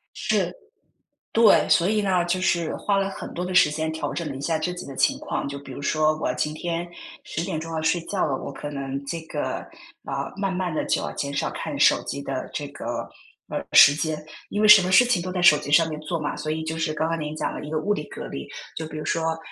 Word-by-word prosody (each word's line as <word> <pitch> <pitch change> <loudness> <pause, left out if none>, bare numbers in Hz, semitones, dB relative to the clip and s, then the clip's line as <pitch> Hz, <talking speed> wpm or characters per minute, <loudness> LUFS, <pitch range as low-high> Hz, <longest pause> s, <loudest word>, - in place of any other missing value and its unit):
是。 - - 0 0.8
对， 225 -2 +6
所 170 +1 +4
以 210 0 +2
呢， 185 -3 +2
就 175 +1 0
是 170 -3 +1
花 200 - 0
了 195 0 +1
很 195 - -7
多 175 - -3
的 185 0 -4
时 150 - +6
间 160 +1 -2
调 160 - -3
整 170 -2 -3
了 140 - -5
一 135 - -7
下 160 +3 0
自 180 +3 -2
己 180 - -7
的 135 - -9
情 - - +3
况， - - -3
就 140 0 -5
比 140 - -12
如 - - -7
说 155 +2 +1
我 - - -1
今 150 - -1
天 170 +2 -3 0.3
10 165 - -4
点 160 - -3
钟 165 +1 -6
要 160 - -1
睡 160 +2 +1
觉 200 - 0
了， 135 -3 -1
我 140 - -6
可 140 +2 -6
能 140 -1 -4
这 165 +4 -3
个 160 - -3 0.5
啊， - - -4
慢 195 -1 -1
慢 180 -3 -2
地 - - -1
就 - - +1
要 - - -4
减 140 0 -3
少 140 - -1
看 - - -5
手 - - +5
机 - - -5
的 - - -4
这 - - -3
个， - - -5 0.4
呃 - - -3
时 145 - +9
间， 155 0 -2 0.3
因 205 - -2
为 215 - +5
什 210 -2 +10
么 180 - -1
事 220 +6 +7
情 240 -8 +1
都 185 - -4
在 180 0 -2
手 165 -4 +7
机 145 - -6
上 165 +2 +5
面 155 -1 -5
做 155 +2 -3
嘛， 150 -2 -3
所 155 - -4
以 160 +1 -2
就 160 0 -3
是 160 -1 -1
刚 155 +1 -1
刚 165 0 -1
您 150 0 -4
讲 - - -2
了 - - -5
一 150 - -7
个 155 - 0
物 205 +7 0
理 175 - -3
隔 - - -7
离， 70 - -7 0.3
就 160 - -3
比 155 - -8
如 155 - -5
说 160 0 0
160 Hz, 285 characters per minute, -24 LUFS, 155-180 Hz, 0.8 s, 什